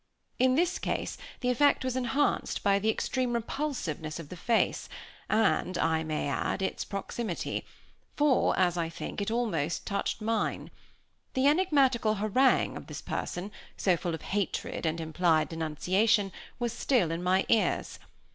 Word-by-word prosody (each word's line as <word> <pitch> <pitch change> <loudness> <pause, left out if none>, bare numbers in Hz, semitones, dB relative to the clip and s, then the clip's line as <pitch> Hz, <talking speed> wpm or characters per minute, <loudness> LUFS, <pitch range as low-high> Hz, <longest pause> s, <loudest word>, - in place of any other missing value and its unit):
In 255 +1 +4
this 350 +4 +1
case - - -2 0.3
the 250 -1 +2
effect 280 +1 +3
was 255 -1 -1
enhanced 260 +3 0
by 200 0 +4
the 215 +2 +1
extreme 250 +2 0
repulsiveness 230 - -3
of 165 -4 -8
the - - -7
face, 225 +6 0 0.4
and, 215 -4 +2
I 160 0 +2
may 155 -2 -2
add, 165 +6 -1
its - - -2
proximity, 200 -1 -4 0.5
for, 290 -3 +3
as 180 -2 +2
I 165 -1 -1
think, 165 - -5
it 200 - -1
almost 205 -10 -1
touched 200 +1 -2
mine. 220 0 -1 0.6
The 260 +1 +2
enigmatical 280 -9 +3
harangue 215 +6 +2
of - - -10
this - - -7
person, 185 +4 -4 0.3
so 185 -3 +3
full 170 0 -3
of 160 - -10
hatred 200 -4 -1
and 160 +1 -1
implied 160 -1 +2
denunciation, 190 +6 +1 0.3
was 240 -2 -2
still 235 - +2
in 165 +1 -2
my 185 +2 +2
ears. 225 - +1
205 Hz, 150 wpm, -29 LUFS, 170-250 Hz, 0.6 s, In